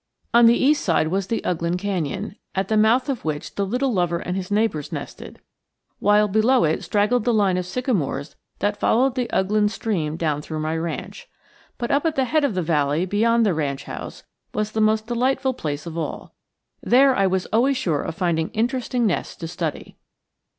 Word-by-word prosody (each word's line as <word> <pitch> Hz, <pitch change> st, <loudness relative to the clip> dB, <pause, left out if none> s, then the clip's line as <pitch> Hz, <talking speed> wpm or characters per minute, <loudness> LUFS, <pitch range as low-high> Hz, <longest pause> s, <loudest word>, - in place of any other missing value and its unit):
On 235 Hz, 0 st, +7 dB
the 235 Hz, -, +5 dB
east 290 Hz, +2 st, +3 dB
side 160 Hz, -3 st, +2 dB
was 190 Hz, +2 st, -1 dB
the 225 Hz, -, -2 dB
Ughland 170 Hz, 0 st, -1 dB
canyon, 195 Hz, +1 st, -3 dB, 0.2 s
at 190 Hz, 0 st, -1 dB
the 220 Hz, -, +2 dB
mouth 220 Hz, +4 st, +3 dB
of 270 Hz, -4 st, -3 dB
which 150 Hz, -2 st, -4 dB
the 200 Hz, -, -1 dB
little 250 Hz, +4 st, 0 dB
lover 175 Hz, -3 st, +1 dB
and 180 Hz, +1 st, -4 dB
his 185 Hz, -1 st, -4 dB
neighbors 205 Hz, -8 st, 0 dB
nested; -, -, -8 dB, 0.6 s
while 210 Hz, +1 st, +4 dB
below 220 Hz, +5 st, +3 dB
it 155 Hz, 0 st, 0 dB
straggled 210 Hz, +3 st, +1 dB
the 245 Hz, -, +2 dB
line 200 Hz, -5 st, +2 dB
of 180 Hz, -1 st, -2 dB
sycamores 180 Hz, -, -2 dB, 0.2 s
that 205 Hz, +1 st, -1 dB
followed 255 Hz, +3 st, +3 dB
the 250 Hz, -2 st, -1 dB
Ughland 210 Hz, +2 st, +2 dB
stream 170 Hz, -9 st, -2 dB
down 150 Hz, -3 st, -1 dB
through 155 Hz, +1 st, -6 dB
my 155 Hz, +1 st, -2 dB
ranch. 170 Hz, -, -5 dB, 0.5 s
But 235 Hz, -, -3 dB
up 285 Hz, +4 st, +2 dB
at 320 Hz, -, -1 dB
the 265 Hz, -, +2 dB
head 305 Hz, +4 st, +1 dB
of 275 Hz, -9 st, 0 dB
the 180 Hz, -, 0 dB
valley 150 Hz, +1 st, +1 dB
beyond 230 Hz, +4 st, +2 dB
the 200 Hz, -, +2 dB
ranch 140 Hz, -4 st, -2 dB
house -, -, -8 dB, 0.3 s
was 215 Hz, 0 st, -1 dB
the 220 Hz, -, -1 dB
most 215 Hz, 0 st, +2 dB
delightful 260 Hz, +3 st, 0 dB
place 150 Hz, -, -4 dB
of 165 Hz, -1 st, -7 dB
all. 165 Hz, -2 st, -5 dB, 0.5 s
There 265 Hz, +1 st, +4 dB
I 195 Hz, -4 st, +3 dB
was 190 Hz, 0 st, 0 dB
always 260 Hz, +4 st, +3 dB
sure 155 Hz, -10 st, 0 dB
of 165 Hz, -, -5 dB
finding 165 Hz, -3 st, 0 dB
interesting 245 Hz, +1 st, 0 dB
nests 200 Hz, -, -1 dB
to 165 Hz, -, -6 dB
study. 170 Hz, -2 st, -5 dB
205 Hz, 195 wpm, -22 LUFS, 170-235 Hz, 0.6 s, On